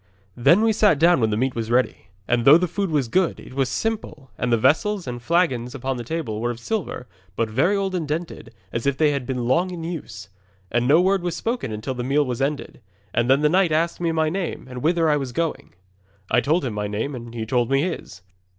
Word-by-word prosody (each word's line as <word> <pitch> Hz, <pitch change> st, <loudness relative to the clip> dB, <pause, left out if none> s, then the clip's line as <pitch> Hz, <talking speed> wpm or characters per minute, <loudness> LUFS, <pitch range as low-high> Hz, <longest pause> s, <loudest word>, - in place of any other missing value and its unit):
Then 170 Hz, -, +4 dB
we 225 Hz, -1 st, +3 dB
sat 205 Hz, -7 st, +4 dB
down 170 Hz, -1 st, +4 dB
when 110 Hz, -, +2 dB
the 105 Hz, -, -1 dB
meat 130 Hz, +2 st, 0 dB
was 115 Hz, -1 st, -4 dB
ready, 120 Hz, -4 st, 0 dB, 0.2 s
and 120 Hz, -1 st, +1 dB
though 140 Hz, +6 st, +8 dB
the 180 Hz, +1 st, 0 dB
food 195 Hz, +3 st, -2 dB
was 145 Hz, -6 st, 0 dB
good, 185 Hz, +8 st, +1 dB
it -, -, -12 dB
was 135 Hz, -1 st, 0 dB
simple, 160 Hz, -12 st, -4 dB
and 125 Hz, -, -2 dB
the 115 Hz, -, +4 dB
vessels 170 Hz, -, +2 dB
and 120 Hz, -1 st, -5 dB
flagons 130 Hz, -5 st, 0 dB
upon 130 Hz, -1 st, -3 dB
the 120 Hz, -, -5 dB
table 115 Hz, -6 st, -4 dB
were 120 Hz, -, 0 dB
of 120 Hz, -1 st, -5 dB
silver, 185 Hz, -, -3 dB, 0.3 s
but 115 Hz, 0 st, -1 dB
very 150 Hz, -, +2 dB
old 195 Hz, -1 st, -1 dB
and 170 Hz, -4 st, -2 dB
dented, 155 Hz, -6 st, -5 dB, 0.2 s
as 115 Hz, +3 st, -2 dB
if 140 Hz, -1 st, +1 dB
they 150 Hz, -1 st, +3 dB
had 140 Hz, -4 st, -3 dB
been 125 Hz, -2 st, -2 dB
long 170 Hz, +9 st, +2 dB
in 175 Hz, -2 st, -6 dB
use. 155 Hz, -, -7 dB, 0.4 s
'And 120 Hz, 0 st, +1 dB
no 150 Hz, +5 st, +6 dB
word 190 Hz, +1 st, +2 dB
was 175 Hz, -1 st, -2 dB
spoken 230 Hz, -, -3 dB
until 110 Hz, +5 st, -4 dB
the 125 Hz, -1 st, -4 dB
meal 140 Hz, +3 st, +2 dB
was 125 Hz, -1 st, -3 dB
ended, 140 Hz, -2 st, -3 dB, 0.3 s
and 120 Hz, +2 st, +1 dB
then 135 Hz, +2 st, +4 dB
the 150 Hz, -, +4 dB
knight 180 Hz, +1 st, +3 dB
asked 165 Hz, +3 st, 0 dB
me 170 Hz, -1 st, +1 dB
my 160 Hz, -1 st, +1 dB
name 185 Hz, -1 st, -3 dB
and 125 Hz, -1 st, -7 dB
whither 165 Hz, +2 st, +2 dB
I 150 Hz, -1 st, +3 dB
was 135 Hz, -3 st, -4 dB
going. 165 Hz, -, -3 dB, 0.6 s
'I 120 Hz, -, +4 dB
told 155 Hz, +4 st, +1 dB
him 120 Hz, -, -3 dB
my 105 Hz, 0 st, -2 dB
name, 110 Hz, +8 st, -3 dB
and 120 Hz, -2 st, -8 dB
he 110 Hz, -1 st, -3 dB
told 120 Hz, +1 st, 0 dB
me 135 Hz, +1 st, +2 dB
his. 165 Hz, -, -5 dB
140 Hz, 240 wpm, -23 LUFS, 120-170 Hz, 0.6 s, though